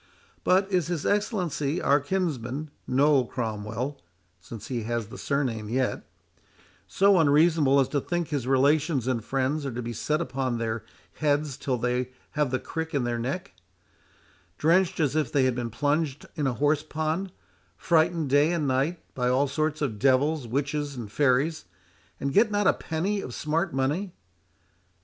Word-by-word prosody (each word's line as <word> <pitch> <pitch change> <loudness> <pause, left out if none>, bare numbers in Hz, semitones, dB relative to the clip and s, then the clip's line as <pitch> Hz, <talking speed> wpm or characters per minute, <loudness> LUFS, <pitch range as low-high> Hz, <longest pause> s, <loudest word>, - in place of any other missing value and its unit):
But 190 +2 +3
is 180 -4 +1
his 170 -4 -3
Excellency, 180 - 0
our 140 +1 +3
kinsman, 145 -3 -2 0.2
Noll 135 -1 +3
Cromwell 115 +3 -4 0.4
(since 110 +3 -9
he 120 -3 -3
has 115 -1 -3
the - - -9
surname 120 -7 -1
yet) 130 +2 -1 0.8
so 195 -1 +4
unreasonable 150 -2 +4
as 135 - +3
to 145 - 0
think 175 +1 -2
his 140 -5 -2
relations 140 +1 +2
and 125 -4 -1
friends 135 +4 -1
are 135 - -3
to 120 +1 -4
be 120 +1 -4
set 150 +7 -1
upon 130 -7 -2
their 110 -1 -2 0.3
heads 145 -2 +1
till 135 -2 -2
they 125 +1 -1 0.2
have 150 -3 0
the 130 - 0
crick 160 +4 -5
in 135 - +1
their 120 -1 -1
neck—drenched 100 - -3
as 150 -3 +1
if 150 -6 0
they 140 - +3
had 130 -1 +2
been 120 -1 -3
plunged 145 +4 -1
in 150 -4 -1
a 130 - 0
horse 145 +5 +2
pond—frightened, 160 0 -1
day 145 +4 +4
and 155 -4 0
night, 135 +6 0
by 125 -1 0
all 135 +3 +2
sort 155 +2 -1
of 110 -7 -2
devils, 135 +2 +2
witches, 145 +3 -2
and 115 -5 -7
fairies, 145 +5 +1 0.5
and 140 0 -2
get 215 +5 +5
not 205 -1 0
a - - +5
penny 190 +6 -2
of 125 - -7
smart 160 +5 -1
money? 150 +9 -1
140 Hz, 160 wpm, -26 LUFS, 125-160 Hz, 0.8 s, get